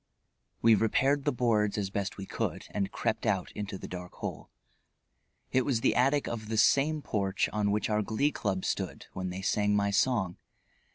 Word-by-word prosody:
We 115 Hz, -, +7 dB
repaired 135 Hz, +6 st, +2 dB
the 145 Hz, -, +3 dB
boards 110 Hz, -5 st, +1 dB
as 100 Hz, -2 st, -2 dB
best 100 Hz, -1 st, -3 dB
we 95 Hz, -, -6 dB
could -, -, -3 dB
and 100 Hz, -1 st, -2 dB
crept -, -, -1 dB
out -, -, 0 dB
into 100 Hz, -2 st, -5 dB
the -, -, -8 dB
dark 90 Hz, 0 st, -7 dB
hole. -, -, -6 dB, 1.0 s
It 130 Hz, -, +3 dB
was 125 Hz, -5 st, 0 dB
the -, -, +3 dB
attic 135 Hz, +3 st, +3 dB
of 110 Hz, -2 st, -4 dB
the 110 Hz, -, -1 dB
same 145 Hz, +6 st, +3 dB
porch 100 Hz, -2 st, 0 dB
on 105 Hz, -1 st, +1 dB
which 105 Hz, +1 st, +1 dB
our 105 Hz, -1 st, +1 dB
Glee 110 Hz, +8 st, +1 dB
Club 95 Hz, -7 st, -2 dB
stood -, -, -3 dB
when 95 Hz, 0 st, -3 dB
they 95 Hz, +1 st, -5 dB
sang 105 Hz, +1 st, +2 dB
my 100 Hz, 0 st, +2 dB
song. 100 Hz, -4 st, +1 dB
105 Hz, 185 wpm, -30 LUFS, 100-125 Hz, 1.0 s, We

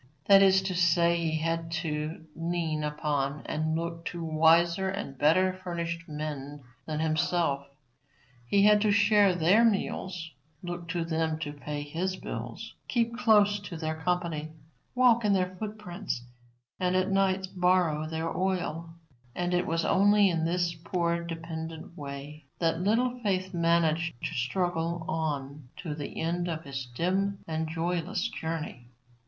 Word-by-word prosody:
That 195 Hz, -1 st, +8 dB
is 190 Hz, -1 st, +5 dB
to 190 Hz, -1 st, -2 dB
say, 170 Hz, -1 st, +3 dB
he 160 Hz, -1 st, 0 dB
had 165 Hz, +1 st, -1 dB
to 155 Hz, 0 st, -3 dB
lean 165 Hz, -2 st, -1 dB
upon 150 Hz, -1 st, -1 dB
and 155 Hz, +1 st, -1 dB
look 165 Hz, 0 st, -3 dB
to 170 Hz, -1 st, -4 dB
wiser 165 Hz, +4 st, +4 dB
and 190 Hz, -8 st, -4 dB
better 170 Hz, +7 st, +3 dB
furnished 170 Hz, -2 st, -5 dB
men 145 Hz, -2 st, -5 dB, 0.2 s
than 155 Hz, -1 st, -2 dB
himself. 155 Hz, -3 st, +1 dB, 0.8 s
He 200 Hz, +9 st, +4 dB
had 210 Hz, 0 st, +6 dB
to 215 Hz, -, +3 dB
share 200 Hz, -1 st, +5 dB
their 180 Hz, +7 st, +4 dB
meals, 185 Hz, -6 st, -1 dB, 0.3 s
look 175 Hz, -1 st, -5 dB
to 170 Hz, 0 st, -2 dB
them 160 Hz, -1 st, 0 dB
to 145 Hz, -2 st, -3 dB
pay 145 Hz, 0 st, -5 dB
his 175 Hz, +6 st, -2 dB
bills, -, -, -6 dB
keep 235 Hz, -1 st, 0 dB
close 210 Hz, -4 st, +4 dB
to 200 Hz, -4 st, -7 dB
their 160 Hz, -1 st, -2 dB
company, 160 Hz, -2 st, -2 dB, 0.4 s
walk 245 Hz, -2 st, +5 dB
in 205 Hz, -1 st, +3 dB
their 185 Hz, -1 st, 0 dB
foot 215 Hz, +2 st, -5 dB
prints, 180 Hz, -, -5 dB, 0.6 s
and 180 Hz, 0 st, +1 dB
at 185 Hz, +1 st, +1 dB
night 190 Hz, -1 st, +1 dB
borrow 180 Hz, -4 st, +2 dB
their 160 Hz, +1 st, -3 dB
oil, 170 Hz, -3 st, -2 dB, 0.4 s
and 175 Hz, 0 st, -1 dB
it 180 Hz, 0 st, +1 dB
was 165 Hz, 0 st, 0 dB
only 205 Hz, 0 st, +5 dB
in 165 Hz, -1 st, 0 dB
this 175 Hz, 0 st, 0 dB
poor 170 Hz, +1 st, -1 dB
dependent 165 Hz, -1 st, -6 dB
way 140 Hz, 0 st, -8 dB
that 165 Hz, 0 st, 0 dB
Little 245 Hz, +5 st, +1 dB
Faith 190 Hz, -4 st, -1 dB
managed 165 Hz, -2 st, +2 dB
to -, -, -2 dB
struggle 170 Hz, +4 st, -1 dB
on 145 Hz, -4 st, -3 dB
to 160 Hz, -5 st, -4 dB
the 150 Hz, -1 st, -6 dB
end 175 Hz, +2 st, -1 dB
of 160 Hz, -2 st, -3 dB
his 135 Hz, -2 st, -5 dB
dim 190 Hz, +10 st, 0 dB
and 160 Hz, 0 st, -2 dB
joyless 175 Hz, +3 st, -1 dB
journey. 160 Hz, -7 st, -5 dB
170 Hz, 150 wpm, -29 LUFS, 160-185 Hz, 0.8 s, That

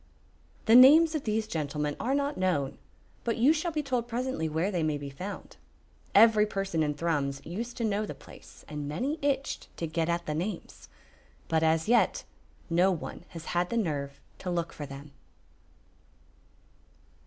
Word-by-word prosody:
The 225 Hz, -, +4 dB
names 300 Hz, +7 st, +8 dB
of 305 Hz, -3 st, -3 dB
these 220 Hz, 0 st, 0 dB
gentlemen 150 Hz, -5 st, -2 dB
are 260 Hz, +4 st, 0 dB
not 285 Hz, +1 st, 0 dB
known, 170 Hz, -8 st, -1 dB, 0.4 s
but 230 Hz, -, -1 dB
you 260 Hz, +7 st, +5 dB
shall 325 Hz, +2 st, -2 dB
be 305 Hz, -1 st, -2 dB
told 250 Hz, -4 st, -1 dB
presently 245 Hz, -8 st, -2 dB
where 165 Hz, +6 st, 0 dB
they 175 Hz, -4 st, -1 dB
may 155 Hz, -2 st, 0 dB
be 140 Hz, -1 st, -7 dB
found. 185 Hz, +9 st, -8 dB, 0.6 s
Every 215 Hz, 0 st, +6 dB
person 195 Hz, -5 st, -2 dB
in 150 Hz, -1 st, 0 dB
Thrums 145 Hz, -4 st, -1 dB
used 230 Hz, +9 st, -5 dB
to 235 Hz, -, -2 dB
know 210 Hz, -1 st, 0 dB
the -, -, -6 dB
place, -, -, -15 dB
and 150 Hz, -2 st, -5 dB
many 265 Hz, -, -2 dB
itched 280 Hz, -1 st, -1 dB
to 170 Hz, -, -2 dB
get 165 Hz, +1 st, -1 dB
at 170 Hz, 0 st, -1 dB
the 150 Hz, -, -2 dB
names, 165 Hz, -, -5 dB, 0.6 s
but 160 Hz, -1 st, +1 dB
as 160 Hz, +1 st, +2 dB
yet 240 Hz, +1 st, +3 dB, 0.4 s
no 175 Hz, +2 st, +3 dB
one 175 Hz, 0 st, -6 dB
has 165 Hz, -2 st, -10 dB
had 175 Hz, 0 st, +1 dB
the 235 Hz, -, -1 dB
nerve 140 Hz, -8 st, -2 dB, 0.2 s
to 185 Hz, -, -5 dB
look 170 Hz, -1 st, -2 dB
for 145 Hz, -, -7 dB
them. 140 Hz, +1 st, -10 dB
180 Hz, 170 wpm, -29 LUFS, 155-235 Hz, 0.6 s, names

